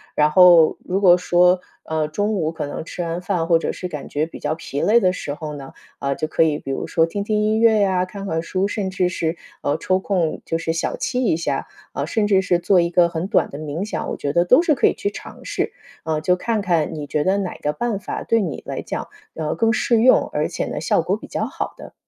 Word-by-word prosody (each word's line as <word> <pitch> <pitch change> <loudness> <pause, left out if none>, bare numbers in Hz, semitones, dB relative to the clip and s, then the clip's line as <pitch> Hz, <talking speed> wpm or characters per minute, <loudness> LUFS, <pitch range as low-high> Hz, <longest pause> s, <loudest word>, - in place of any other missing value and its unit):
然 150 0 +3
后 175 -2 +7
如 190 +2 -1
果 180 -3 +7
说， 180 0 +3 0.2
呃， 160 -1 -1
中 205 +7 -1
午 160 -4 -1
可 165 - -4
能 145 - -5
吃 175 - -6
完 170 +1 -3
饭， 180 -3 -1
或 170 - +5
者 - - -2
是 180 - -5
感 150 -5 -7
觉 150 +2 0
比 - - -11
较 150 +1 -1
疲 145 -3 -5
累 230 +3 +5
的 185 -4 +3
时 145 -5 -5
候， 155 -2 -6
呢， 135 -2 -10 0.3
啊， 140 0 -1
就 155 - -2
可 160 - 0
以 155 -2 +1
比 135 - -6
如 135 - -3
说 165 - +2
听 200 +5 -4
听 210 0 0
音 215 +1 +1
乐 225 -1 +5
呀， 185 -2 +2
看 200 +1 -8
看 160 -2 -1
书， 190 +3 -1
甚 205 -2 -2
至 185 -1 +1
是， 165 -1 -2 0.3
呃， 145 - +1
抽 185 +3 +1
空 180 -5 -1
就 165 - -1
是 165 - -1
小 165 - -2
憩 250 - -2
一 235 -10 +2
下。 165 - -2 0.3
啊， - - -2
甚 220 -3 0
至 195 -2 +4
是 180 -2 +1
做 180 +2 +3
一 170 0 +2
个 175 0 +4
很 170 +2 -3
短 - - +2
的 140 - -8
冥 155 +3 -4
想， 210 - -4
我 - - -3
觉 140 - -3
得 170 +4 +2
都 255 - +6
是 330 -4 +2
可 - - +3
以 - - +2
去 200 - -2
尝 - - -10
试。 - - -2 0.3
啊， 160 -1 -1
就 180 +3 +2
看 225 +1 -1
看 170 -5 0
你 150 -1 -5
觉 150 0 0
得 195 +2 +2
哪 190 -3 -3
个 150 0 -2
办 215 +4 -2
法 185 - -5
对 230 -1 +2
你 165 -8 -4
来 - - -4
讲， - - -5 0.3
呃， 155 -1 -2
更 225 +6 +2
适 235 -1 +2
用， 255 +2 +5
而 - - 0
且 - - -3
呢， - - -4
效 - - +2
果 - - -1
比 - - -11
较 - - -2
好 - - -5
的。 - - -11
175 Hz, 280 characters per minute, -21 LUFS, 160-200 Hz, 0.3 s, 后